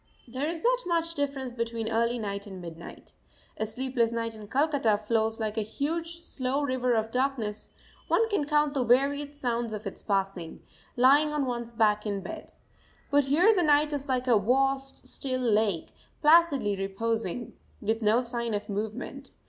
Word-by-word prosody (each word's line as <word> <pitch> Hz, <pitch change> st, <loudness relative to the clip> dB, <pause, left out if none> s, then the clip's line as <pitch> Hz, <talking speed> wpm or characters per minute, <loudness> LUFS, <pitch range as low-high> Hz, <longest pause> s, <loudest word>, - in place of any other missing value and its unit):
There 260 Hz, +5 st, -3 dB
is 335 Hz, -1 st, -5 dB
not -, -, +2 dB
much 335 Hz, -1 st, 0 dB
difference 275 Hz, -4 st, -3 dB
between 230 Hz, -1 st, -3 dB
early 230 Hz, +2 st, +1 dB
night 200 Hz, -2 st, -4 dB
and 190 Hz, -2 st, -8 dB
midnight. 170 Hz, -1 st, -10 dB, 0.4 s
A 220 Hz, -, -1 dB
sleepless 245 Hz, 0 st, 0 dB
night 230 Hz, -1 st, -2 dB
in 215 Hz, -1 st, -10 dB
Calcutta 275 Hz, -5 st, +2 dB
flows 220 Hz, +1 st, 0 dB
like 220 Hz, 0 st, -1 dB
a -, -, +1 dB
huge, 330 Hz, +9 st, -3 dB
slow 270 Hz, -2 st, -2 dB
river 255 Hz, -2 st, +1 dB
of 220 Hz, 0 st, -1 dB
darkness; 250 Hz, -5 st, -2 dB, 0.3 s
one 455 Hz, -, +3 dB
can 410 Hz, -9 st, 0 dB
count 295 Hz, -1 st, +2 dB
the 270 Hz, -3 st, +1 dB
varied 280 Hz, +4 st, +2 dB
sounds 240 Hz, -4 st, -2 dB
of 215 Hz, +1 st, -6 dB
its 195 Hz, -, -6 dB
passing, 195 Hz, -4 st, -2 dB, 0.3 s
lying 280 Hz, +5 st, +5 dB
on 300 Hz, -2 st, 0 dB
one's 235 Hz, -2 st, -3 dB
back 215 Hz, -2 st, +2 dB
in 200 Hz, -1 st, -2 dB
bed. -, -, -8 dB, 0.6 s
But 285 Hz, -1 st, +4 dB
here 340 Hz, +11 st, +5 dB
the 375 Hz, -, +2 dB
night 300 Hz, -1 st, +3 dB
is 280 Hz, -1 st, -4 dB
like 255 Hz, -1 st, +1 dB
a 235 Hz, -5 st, +4 dB
vast, 270 Hz, +4 st, 0 dB
still 255 Hz, -2 st, -3 dB
lake, 215 Hz, -7 st, +1 dB, 0.3 s
placidly 300 Hz, -9 st, +4 dB
reposing, 220 Hz, +3 st, -2 dB, 0.3 s
with 220 Hz, +2 st, -1 dB
no 220 Hz, +3 st, +3 dB
sign 235 Hz, -2 st, -2 dB
of 205 Hz, +1 st, -5 dB
movement. 220 Hz, +7 st, -5 dB
245 Hz, 170 wpm, -28 LUFS, 220-285 Hz, 0.6 s, lying